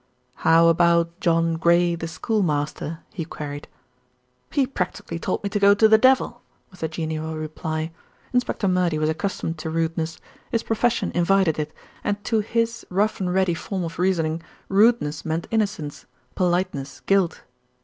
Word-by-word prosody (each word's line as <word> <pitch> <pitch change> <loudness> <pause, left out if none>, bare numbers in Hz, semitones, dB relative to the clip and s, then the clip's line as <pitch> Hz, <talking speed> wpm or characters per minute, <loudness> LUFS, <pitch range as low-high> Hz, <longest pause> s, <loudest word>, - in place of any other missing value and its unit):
"How 165 +1 +5
about 170 0 +3
John 165 -2 +2
Gray, 170 +1 +3
the 165 -1 -4
schoolmaster?" 160 -3 -1
he 180 -6 -3
queried. 145 -2 -7 0.8
"He 280 -3 +2
practically 180 -8 -4
told 185 - -2
me 200 - -1
to 205 - 0
go 200 0 +6
to 220 +2 +6
the 220 0 +6
devil," 255 -1 +3 0.3
was 185 - -16
the 160 - -1
genial 160 0 -4
reply. 155 +1 -4 0.4
Inspector 245 -4 0
Murdy 180 -3 +2
was 155 0 +1
accustomed 165 -1 -3
to 160 - -4
rudeness; 165 0 -1 0.3
his 230 -1 0
profession 230 +1 0
invited 175 -2 +2
it, 150 0 -2 0.3
and 205 0 -2
to 220 0 +1
his 230 +2 -1
rough 205 +4 +1
and 180 -2 -1
ready 185 -1 +2
form 185 +3 -4
of 165 0 -6
reasoning, 165 -3 +1 0.3
rudeness 195 -8 +3
meant 160 +1 -2
innocence; 205 -9 -2 0.3
politeness 175 -6 -1
guilt. 195 -4 +1
170 Hz, 150 wpm, -23 LUFS, 160-200 Hz, 0.8 s, go